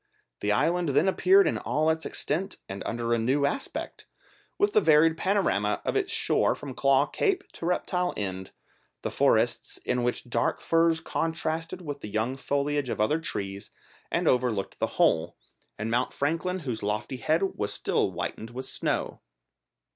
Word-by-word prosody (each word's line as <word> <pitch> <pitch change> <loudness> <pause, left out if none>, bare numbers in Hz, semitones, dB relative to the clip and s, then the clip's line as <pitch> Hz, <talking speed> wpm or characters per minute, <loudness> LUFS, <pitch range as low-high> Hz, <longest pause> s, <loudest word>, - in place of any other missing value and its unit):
The - - 0
island 175 -1 +2
then 145 +6 +3
appeared 380 - +5
in - - 0
all 155 +1 +1
its 160 0 -2
extent 185 +6 -3
and 95 +1 -6
under 120 0 -1
a 115 - +2
new 135 +5 +2
aspect, 145 - -4 0.5
with 410 0 +2
the - - +5
varied 160 +1 +5
panorama 170 - +1
of - - -1
its - - 0
shore - - +2
from 140 -2 -7
Claw 135 +1 +3
Cape 390 - 0
to 170 - -5
Reptile 180 0 0
End, 95 -2 -4 0.5
the - - -2
forests - - +2
in 125 - 0
which 120 0 -2
dark 115 -1 0
firs 165 -1 +2
contrasted 165 +2 -2
with 145 -3 -5
the 105 - -6
young 110 +5 -1
foliage 140 0 -1
of - - -3
other 130 +10 +2
trees 100 -11 -4 0.4
and - - 0
overlooked 120 -6 +1
the - - +1
whole, 80 - +2 0.4
and 110 +2 -3
Mount 125 +2 +1
Franklin 165 +6 -1
whose 125 -7 -3
lofty 105 +5 -2
head 155 +9 +1
was 105 0 -2
still - - 0
whitened 110 - -5
with 130 +2 -6
snow. - - -2
140 Hz, 165 wpm, -27 LUFS, 115-165 Hz, 0.5 s, appeared